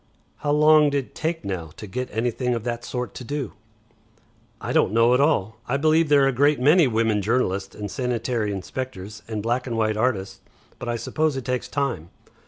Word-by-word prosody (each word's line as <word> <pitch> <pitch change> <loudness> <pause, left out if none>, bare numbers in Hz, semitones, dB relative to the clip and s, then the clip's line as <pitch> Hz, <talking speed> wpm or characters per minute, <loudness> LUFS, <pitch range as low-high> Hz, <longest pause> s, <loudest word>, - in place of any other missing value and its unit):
"How 145 - -4
long'd 150 -1 +5
it 135 -3 -2
take 160 +1 -3
now, 90 -5 -4
to - - -7
get 125 +6 -4
anything 120 +2 -1
of 115 - -4
that 120 0 -3
sort 125 0 -4
to - - -8
do?" 140 -2 -4 1.1
"I - - -4
don't 100 - +3
know 115 +2 +5
at 125 - +3
all. 110 -8 +1
I 135 - +1
believe 155 +2 +3
there 145 -1 +5
are - - +4
a - - +3
great 145 +3 +3
many 150 +4 +5
women 110 -3 +1
journalists 100 -3 -1
and 105 -1 -6
sanitary 120 -4 -1
inspectors, 105 0 -6
and 110 -2 -4
black 120 +3 -1
and 115 -2 -2
white 110 -1 +1
artists. 110 -5 -1 0.4
But 120 - -5
I 120 - 0
suppose 150 +5 -1
it 130 - -5
takes 125 -1 -2
time. 140 - -2
125 Hz, 195 wpm, -24 LUFS, 110-140 Hz, 1.1 s, long'd